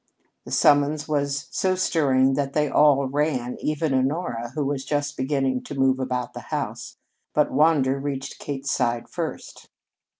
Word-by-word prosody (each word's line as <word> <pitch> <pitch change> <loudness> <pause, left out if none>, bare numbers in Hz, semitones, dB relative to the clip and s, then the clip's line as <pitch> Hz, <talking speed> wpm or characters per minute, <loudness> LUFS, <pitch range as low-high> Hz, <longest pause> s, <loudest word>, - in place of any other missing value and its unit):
The - - -9
summons 145 +1 +3
was 140 -2 -1
so 185 -1 +1
stirring 135 -7 +2
that 140 0 -1
they 150 -1 +2
all 145 -2 +4
ran, 130 -3 -1
even 155 -1 -1
Honora, 130 -3 -1
who 150 -2 -1
was 135 -1 -2
just 145 0 -2
beginning 135 -1 0
to 145 - -6
move 135 0 +3
about 125 -2 -3
the - - -6
house, - - -4 0.4
but 150 - +3
Wander 140 -3 +3
reached 135 -1 -5
Kate's 135 -1 -4
side 120 0 0
first. - - -6
140 Hz, 155 wpm, -24 LUFS, 130-150 Hz, 0.4 s, all